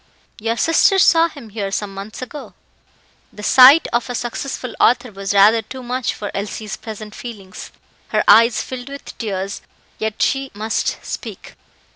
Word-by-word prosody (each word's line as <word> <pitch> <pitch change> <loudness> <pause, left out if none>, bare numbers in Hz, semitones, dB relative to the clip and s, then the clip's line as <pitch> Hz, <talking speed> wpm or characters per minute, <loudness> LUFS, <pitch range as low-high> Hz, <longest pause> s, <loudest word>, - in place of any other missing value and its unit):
Your 225 +2 -2
sister 330 - +3
saw 335 -2 +5
him 275 -8 -12
here 200 -2 -4
some 200 0 -3
months 200 +5 -8
ago." 290 +3 -9 0.8
The 210 - -11
sight 265 +7 +7
of 240 +1 0
a 245 - -3
successful 245 +1 -4
author 245 0 +3
was 195 0 -4
rather 205 +3 +5
too 260 +3 -10
much 250 0 -2
for 205 - -6
Elsie's 210 +1 -5
present 215 -2 -9
feelings. 205 -7 -9 0.4
Her - - 0
eyes 230 +1 +6
filled 255 0 -7
with 280 0 -9
tears, 195 -3 -4
but - - -32 0.3
yet 220 0 -3
she 270 -1 0
must 215 +2 -2
speak. - - -7
230 Hz, 160 wpm, -19 LUFS, 210-255 Hz, 0.8 s, sight